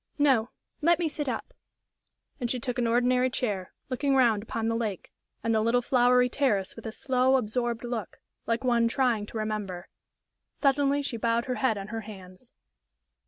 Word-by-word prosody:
"No; 265 Hz, -6 st, +3 dB, 0.3 s
let 340 Hz, +2 st, +4 dB
me 345 Hz, -, 0 dB
sit 295 Hz, -2 st, -2 dB
up." -, -, -5 dB, 0.9 s
And 240 Hz, -2 st, -2 dB
she 250 Hz, -, -1 dB
took 250 Hz, +1 st, -3 dB
an 240 Hz, -, +1 dB
ordinary 250 Hz, +2 st, +3 dB
chair, 205 Hz, -8 st, -3 dB, 0.2 s
looking 275 Hz, +1 st, 0 dB
round 235 Hz, -5 st, +4 dB
upon 225 Hz, +1 st, -3 dB
the 230 Hz, -, 0 dB
lake 215 Hz, -5 st, -3 dB, 0.3 s
and 230 Hz, -, +1 dB
the 220 Hz, -, +3 dB
little 240 Hz, +2 st, +2 dB
flowery 250 Hz, 0 st, +4 dB
terrace 235 Hz, -8 st, 0 dB
with -, -, -8 dB
a -, -, -4 dB
slow, 260 Hz, +2 st, +2 dB
absorbed 240 Hz, -1 st, -1 dB
look, 235 Hz, -5 st, -5 dB, 0.3 s
like 230 Hz, +2 st, 0 dB
one 235 Hz, -2 st, +3 dB
trying 230 Hz, -4 st, +1 dB
to 225 Hz, -, -7 dB
remember. 210 Hz, -5 st, -4 dB, 0.7 s
Suddenly 280 Hz, 0 st, +2 dB
she 245 Hz, -4 st, -3 dB
bowed 230 Hz, +1 st, +1 dB
her 255 Hz, -, -2 dB
head 255 Hz, -5 st, +2 dB
on 195 Hz, +1 st, -6 dB
her 225 Hz, 0 st, -4 dB
hands. 195 Hz, +1 st, -11 dB
240 Hz, 175 wpm, -28 LUFS, 220-255 Hz, 0.9 s, let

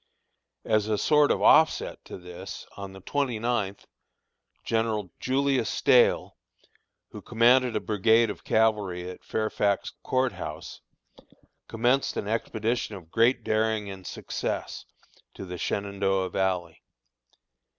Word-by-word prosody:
As 110 Hz, -1 st, +1 dB
a 110 Hz, -1 st, 0 dB
sort 150 Hz, +5 st, +4 dB
of -, -, +1 dB
offset 160 Hz, 0 st, +4 dB
to -, -, -8 dB
this, 90 Hz, -1 st, -9 dB
on 100 Hz, -1 st, -7 dB
the 95 Hz, 0 st, -12 dB
twenty 130 Hz, +2 st, -1 dB
ninth, 110 Hz, -4 st, -2 dB, 0.8 s
General 110 Hz, -4 st, -1 dB
Julius 135 Hz, -2 st, +1 dB
Stahel, 125 Hz, -2 st, +3 dB, 0.7 s
who -, -, -9 dB
commanded 120 Hz, +1 st, +3 dB
a -, -, +2 dB
brigade 110 Hz, +2 st, +3 dB
of -, -, -11 dB
cavalry 105 Hz, -5 st, +1 dB
at 90 Hz, -, -9 dB
Fairfax 105 Hz, -2 st, -1 dB
Court 130 Hz, -1 st, 0 dB
House, 80 Hz, -4 st, -8 dB, 0.9 s
commenced 125 Hz, +4 st, +1 dB
an -, -, -3 dB
expedition 110 Hz, 0 st, -2 dB
of 85 Hz, -4 st, -12 dB
great 120 Hz, +1 st, +3 dB
daring 110 Hz, -2 st, 0 dB
and 95 Hz, -2 st, -10 dB
success, -, -, -4 dB, 0.5 s
to 95 Hz, -, -7 dB
the 90 Hz, -1 st, -7 dB
Shenandoah 100 Hz, -2 st, -1 dB
Valley. 90 Hz, -3 st, -2 dB
110 Hz, 120 wpm, -27 LUFS, 95-120 Hz, 0.9 s, sort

